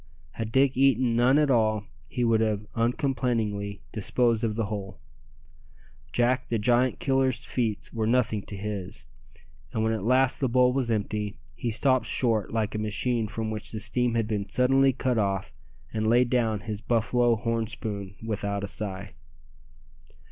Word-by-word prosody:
Had 110 -1 -5
Dick 135 +1 +3
eaten 130 -3 +3
none 125 +4 +4
at 150 -2 +3
all 110 -3 +2 0.3
he 125 - -2
would 115 -1 +3
have 105 -2 0
uncomplainingly 115 -4 -1
disposed 115 +2 +1
of 110 -2 0
the 115 -1 0
whole. 100 -3 -5 1.1
Jack 125 - +1
the 115 - +1
Giant 120 +4 +2
Killer's 135 -2 +1
feats 115 -5 -2
were 110 -1 -1
nothing 115 -3 +2
to 100 - -6
his; 95 -6 -5 0.7
and 110 - -1
when 110 0 +1
at 110 -4 -3
last 130 +3 +3
the 130 - +1
bowl 125 +1 +4
was 130 -3 0
empty, 105 -3 -2 0.2
he 120 - -3
stopped 130 +2 +2
short 115 -5 0
like 110 -2 -1
a 105 - -2
machine 110 +2 -1
from 110 +1 -3
which 110 -1 -4
the 110 - -4
steam 120 +2 0
had 115 -2 +1
been 105 -3 -2
suddenly 135 +4 +4
cut 125 -2 0
off, 95 -7 -1 0.4
and 110 0 0
laid 120 +2 +3
down 115 -5 +1
his 105 0 -5
buffalo 120 +1 +2
horn 115 0 -1
spoon 100 -3 -5
without 100 -2 -2
a - - -2
sigh. 100 -2 -3
115 Hz, 165 wpm, -27 LUFS, 105-125 Hz, 1.1 s, none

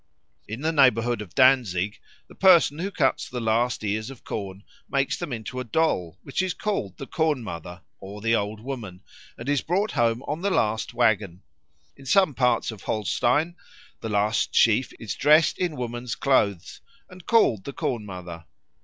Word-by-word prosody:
In 110 +5 -6
the 160 +2 +1
neighbourhood 120 -6 +3
of 100 -5 -10
Danzig 115 -7 +3 0.3
the - - -15
person 170 -5 +5
who 190 +3 -2
cuts 145 -9 0
the 125 - -4
last 115 +1 0
ears 110 +3 -2
of 135 -3 -12
corn 100 -2 -6 0.3
makes 140 -1 0
them 175 -5 -6
into 120 +2 -5
a - - -3
doll, 105 - 0
which 140 - -2
is 185 -1 -2
called 195 - -3
the 135 - -7
Corn 155 -4 0
mother 90 -2 -8 0.2
or 100 +2 -9
the 115 +2 +2
Old 105 0 -3
Woman 110 -8 -7 0.3
and 120 - -8
is 145 -2 +1
brought 195 +5 0
home 115 +1 +1
on 150 +3 -4
the 200 - 0
last 110 - 0
waggon. 105 -6 +1 0.5
In 135 - -14
some 190 -1 +4
parts 125 -3 +1
of 105 -4 -11
Holstein 125 - 0 0.4
the 110 - -5
last 105 +2 0
sheaf 115 +3 +4
is 115 - -4
dressed 150 +3 +4
in 175 -4 -1
woman's 120 -2 -4
clothes 100 -10 0 0.3
and 185 -2 -15
called 120 - +3
the 140 - -6
Corn 120 -4 -2
mother. 90 -4 -9
120 Hz, 175 wpm, -25 LUFS, 105-145 Hz, 0.5 s, person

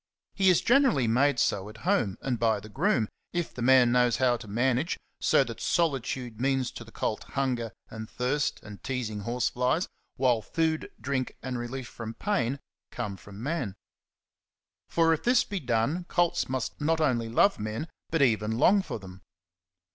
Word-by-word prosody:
He 190 -1 +3
is 180 - +4
generally 245 - +4
made 135 +4 +3
so 100 -3 0
at 110 - -12
home 175 - +1
and 125 -4 -1
by 110 -2 +2
the 105 +2 -11
groom, 135 - +1 0.3
if 175 -2 -2
the 125 - -7
man 125 -1 +6
knows 125 -1 +3
how 125 -1 +3
to 115 -1 -11
manage 125 - 0 0.2
so - - +4
that - - -8
solitude 130 -7 -1
means 135 -1 +1
to - - -8
the 115 - -15
colt 110 - -2
hunger 125 -5 -2 0.2
and 110 0 -8
thirst 135 +4 -1
and 105 -1 -10
teasing 120 -5 -3
horseflies, 125 - 0 0.3
while 125 -3 +2
food, 160 +6 -1
drink, 130 -2 -2
and 125 -2 -3
relief 120 +1 -5
from 115 -1 -7
pain 140 - -1 0.3
come 105 -5 -4
from 100 +3 -11
man. 135 - -2 1.1
For 165 -1 +3
if 160 - -2
this 245 0 +4
be 200 - -4
done, 125 +7 0
colts 175 -6 +1
must 130 +2 -3
not 160 +2 +2
only 120 -7 +1
love 195 - +3
men, 110 +8 -3 0.2
but 160 -3 +2
even 110 -3 +1
long 195 +10 +5
for 190 - -5
them. 95 -2 -12
125 Hz, 170 wpm, -28 LUFS, 115-155 Hz, 1.1 s, man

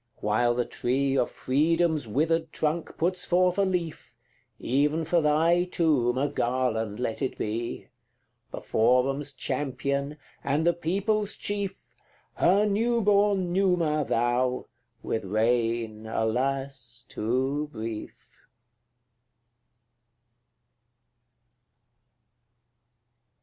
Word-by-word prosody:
While 120 +3 +1
the 125 0 0
tree 135 +2 -1
Of 125 - +1
freedom's 155 +1 +1
withered 160 +7 0
trunk 160 +2 -2
puts 180 +2 0
forth 180 +1 +2
a - - +4
leaf, 175 -4 -3 0.4
Even 150 +5 0
for 170 +1 +2
thy 165 +4 +3
tomb 145 -9 +1
a 140 +2 +1
garland 120 -5 -1
let 120 -1 -2
it 135 - -2
be 115 +2 -3 0.6
The - - -7
forum's 135 +5 +1
champion, 140 +1 -2 0.3
and 145 +4 0
the 175 - +4
people's 200 +5 -1
chief 200 -2 -3 0.5
Her 195 +4 +3
new 230 +3 +1
born 200 -3 +2
Numa 175 -5 +2
thou, 125 +1 0 0.4
with 110 - -2
reign, 110 +1 0
alas! 125 +2 -2
too 130 +7 -1
brief. 110 -3 -8
140 Hz, 95 wpm, -27 LUFS, 120-170 Hz, 0.6 s, a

